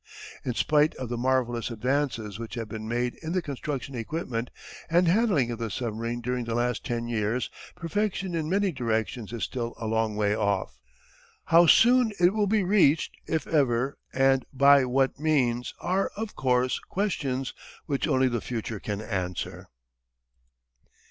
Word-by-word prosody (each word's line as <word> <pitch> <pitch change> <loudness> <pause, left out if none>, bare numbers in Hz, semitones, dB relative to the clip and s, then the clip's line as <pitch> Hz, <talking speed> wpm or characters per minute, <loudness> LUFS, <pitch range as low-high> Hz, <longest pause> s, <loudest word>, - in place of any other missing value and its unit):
In 125 - -2
spite 150 +3 +3
of 130 -3 -6
the 120 - -2
marvellous 120 -2 0
advances 115 -3 -1
which 115 +1 -6
have 115 -2 -4
been 110 0 -6
made 120 +1 -1
in 160 +1 -4
the 185 - +1
construction, 140 -1 -4
equipment, 120 -1 -3 0.4
and 175 +2 +4
handling 180 - +3
of 115 - -5
the 115 -1 -2
submarine 115 +1 -3
during 125 0 -2
the 115 0 -2
last 120 -1 0
ten 120 -1 -3
years, 115 +1 -1 0.2
perfection 190 +1 -2
in 160 -2 -2
many 195 +1 +2
directions 115 - -2
is 120 -2 -4
still 120 -2 -3
a 115 - -5
long 110 -1 0
way 105 0 +1
off. 95 - -1 0.7
How 170 +1 +6
soon 240 +3 +6
it 180 +2 +5
will 210 -1 +1
be 210 0 +2
reached, 180 -5 +3
if 160 - -1
ever, 135 -3 +1
and 135 0 +3
by 140 0 +6
what 135 +2 +1
means, 130 -6 +1
are, 190 +2 0
of 220 0 -5
course, 125 -1 +1
questions 140 -10 -2 0.3
which 140 -3 -1
only 130 0 +3
the 120 -3 -1
future 115 -3 -4
can 105 +1 -4
answer. 95 -5 -4
125 Hz, 160 wpm, -27 LUFS, 115-155 Hz, 0.7 s, How